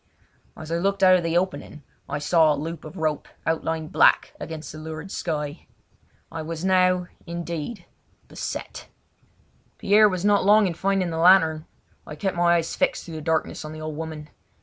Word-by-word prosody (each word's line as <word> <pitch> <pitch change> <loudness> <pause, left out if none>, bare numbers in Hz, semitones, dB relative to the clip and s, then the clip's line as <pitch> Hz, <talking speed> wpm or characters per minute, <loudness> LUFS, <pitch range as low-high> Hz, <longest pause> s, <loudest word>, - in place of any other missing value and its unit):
As 155 +1 -8
I 165 - +1
looked 195 +1 0
out 185 0 +7
of - - -2
the 165 0 0
opening 175 -4 -3 0.3
I - - -2
saw 155 0 +3
the - - -6
loop 165 0 -6
of 155 +4 -10
a - - -7
rope 155 -2 -1 0.2
outlined 160 -1 -2
black - - +4
against 160 -1 -7
the 155 - -9
lurid 160 +3 -7
sky. 150 -2 -4 0.6
I 165 - -5
was 165 +2 -5
now, 185 -1 +3 0.2
indeed, 170 +3 -5 0.4
beset! - - -6 0.9
Pierre 210 +1 +5
was 185 0 -3
not 205 -1 +4
long 210 +2 +5
in 180 - -1
finding 190 0 0
the 160 - -3
lantern. 165 -3 +5 0.4
I 150 - -7
kept 190 +5 -2
my 175 0 +3
eyes 165 -1 -1
fixed - - 0
through 165 - -9
the - - -6
darkness 160 0 -1
on 155 0 -7
the 155 - -8
old 155 -1 -5
woman. 155 -1 -7
165 Hz, 185 wpm, -24 LUFS, 155-185 Hz, 0.9 s, out